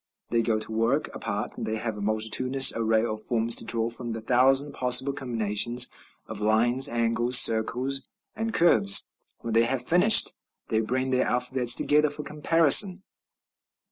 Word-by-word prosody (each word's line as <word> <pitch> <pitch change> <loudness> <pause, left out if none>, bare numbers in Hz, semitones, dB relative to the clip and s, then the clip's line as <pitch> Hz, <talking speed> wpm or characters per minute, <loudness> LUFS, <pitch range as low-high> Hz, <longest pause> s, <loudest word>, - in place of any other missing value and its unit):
They 115 0 -1
go 115 -1 -3
to 110 +1 -4
work 115 +6 -3
apart; 105 -1 -7
they 110 - -6
have 110 0 -6
a 105 - -10
multitudinous 110 +5 +2
array 110 0 -2
of 110 -2 -6
forms 115 0 0
to - - -1
draw 115 0 -2
from 120 0 -3
the 115 - -9
thousand 135 +4 0
possible 125 +2 +2
combinations 120 -1 0 0.3
of - - -11
lines, 120 +6 +2
angles, 120 +1 +1
circles, 125 +5 +2 0.3
and 225 +1 -6
curves; 110 - +2 0.3
when 115 - -7
they 115 +1 +1
have 125 +1 -5
finished, 180 - +4 0.4
they 110 - -2
bring 130 +4 -4
their 130 0 -2
alphabets 125 0 +2
together 150 +1 0
for 150 +1 -8
comparison. 165 +5 +3
120 Hz, 155 wpm, -23 LUFS, 110-135 Hz, 0.4 s, finished